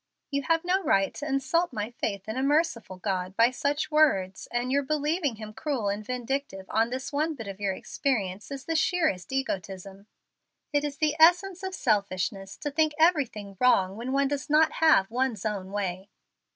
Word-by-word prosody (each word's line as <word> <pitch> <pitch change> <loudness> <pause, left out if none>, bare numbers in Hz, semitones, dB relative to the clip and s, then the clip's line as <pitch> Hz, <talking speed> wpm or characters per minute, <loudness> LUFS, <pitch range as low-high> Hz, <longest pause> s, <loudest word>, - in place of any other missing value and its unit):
"You 280 0 0
have 330 +1 +2
no 370 +2 +2
right 195 - +2
to 295 - -6
insult 295 +5 +1
my 210 +2 -4
faith 200 -4 -4
in 220 - -3
a 260 - -1
merciful 275 - 0
God 185 -1 -3
by 230 +2 +5
such 285 +4 -1
words, 195 -12 +2
and 245 +1 -1
your 280 +1 +3
believing 300 0 0
Him 215 0 -9
cruel 250 -6 -2
and 205 +1 -3
vindictive 250 -4 -3
on 225 +2 +2
this 260 +3 -5
one 310 +2 0
bit 225 -6 -8
of 195 0 -7
your 200 -2 0
experience 205 -5 -2
is 275 -2 -7
the 325 - -2
sheerest 315 - +1
egotism. 195 -6 -4 0.7
It 290 0 +2
is 290 -1 -3
the 305 -1 +1
essence 355 +3 +5
of 380 -1 -4
selfishness 195 - -1
to 290 - -4
think 310 +1 +2
everything 265 - +1
wrong 195 -7 +3
when 240 +4 -5
one 275 +1 +2
does 285 0 -3
not 310 +1 +5
have 220 -12 +5
one's 240 -4 -1
own 195 -3 -3
way." 195 -1 -3
255 Hz, 185 wpm, -27 LUFS, 200-300 Hz, 0.7 s, by